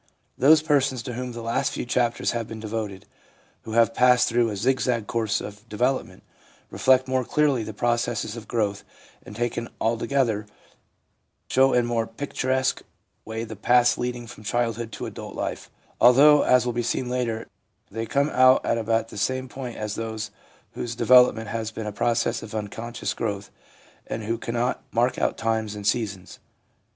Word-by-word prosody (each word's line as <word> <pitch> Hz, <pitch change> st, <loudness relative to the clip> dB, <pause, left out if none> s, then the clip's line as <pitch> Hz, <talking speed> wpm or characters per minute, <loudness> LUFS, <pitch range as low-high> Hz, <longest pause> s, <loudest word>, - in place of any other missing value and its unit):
Those 155 Hz, +3 st, +5 dB
persons 140 Hz, -5 st, +1 dB
to 125 Hz, -, -5 dB
whom 125 Hz, +1 st, -4 dB
the 115 Hz, 0 st, -7 dB
last 115 Hz, +1 st, 0 dB
few -, -, -4 dB
chapters 120 Hz, -1 st, 0 dB
have 115 Hz, -2 st, -3 dB
been 110 Hz, -, -7 dB
devoted, 105 Hz, -3 st, -5 dB, 0.6 s
who 110 Hz, -, -8 dB
have 115 Hz, 0 st, +4 dB
passed 125 Hz, +1 st, +4 dB
through 120 Hz, 0 st, +2 dB
a 105 Hz, -, -4 dB
zigzag 120 Hz, +1 st, 0 dB
course 110 Hz, -1 st, 0 dB
of 105 Hz, +2 st, -10 dB
development, 120 Hz, -3 st, -1 dB, 0.5 s
reflect 130 Hz, 0 st, +3 dB
more 130 Hz, 0 st, +1 dB
clearly 145 Hz, -1 st, +1 dB
the 110 Hz, -, -5 dB
processes 120 Hz, 0 st, -1 dB
of 115 Hz, -2 st, -9 dB
growth, 105 Hz, -4 st, -1 dB, 0.4 s
and, 105 Hz, -, -11 dB
taken 120 Hz, 0 st, -2 dB
all 115 Hz, 0 st, 0 dB
together, 115 Hz, -5 st, 0 dB, 1.0 s
show 135 Hz, +1 st, +5 dB
in 125 Hz, -1 st, +3 dB
more 115 Hz, -1 st, -1 dB
picturesque 130 Hz, +1 st, -1 dB, 0.4 s
way 110 Hz, 0 st, -4 dB
the 110 Hz, -1 st, -7 dB
paths 120 Hz, +4 st, +4 dB
leading 120 Hz, -1 st, -4 dB
from 115 Hz, -2 st, -12 dB
childhood 115 Hz, +1 st, -1 dB
to -, -, -5 dB
adult -, -, -8 dB
life; -, -, -4 dB, 0.3 s
although, 145 Hz, +4 st, +7 dB
as 125 Hz, -1 st, +4 dB
will 120 Hz, -, -1 dB
be 120 Hz, -, -1 dB
seen 120 Hz, +2 st, -1 dB
later, 120 Hz, -3 st, -2 dB, 0.5 s
they 115 Hz, +2 st, -4 dB
come 140 Hz, +5 st, +1 dB
out 130 Hz, +1 st, +5 dB
at 115 Hz, -, +1 dB
about 115 Hz, 0 st, 0 dB
the 105 Hz, -, -7 dB
same 130 Hz, +4 st, -1 dB
point 125 Hz, -2 st, -7 dB
as 105 Hz, -1 st, -3 dB
those 110 Hz, -2 st, -4 dB, 0.4 s
whose 120 Hz, -1 st, -5 dB
develop 125 Hz, +2 st, +6 dB
ment 110 Hz, -2 st, -6 dB
has 110 Hz, 0 st, -3 dB
been 110 Hz, -1 st, -6 dB
a 105 Hz, -, -3 dB
process 115 Hz, +2 st, 0 dB
of 110 Hz, -, -8 dB
unconscious 115 Hz, +3 st, -4 dB
growth, 100 Hz, -3 st, -4 dB, 0.6 s
and 110 Hz, -, -4 dB
who 115 Hz, +2 st, -2 dB
cannot 120 Hz, +2 st, -1 dB
mark 120 Hz, +2 st, +1 dB
out -, -, 0 dB
times 110 Hz, -2 st, -1 dB
and 105 Hz, -1 st, -7 dB
seasons. 100 Hz, -4 st, -2 dB
115 Hz, 175 wpm, -25 LUFS, 110-125 Hz, 1.0 s, although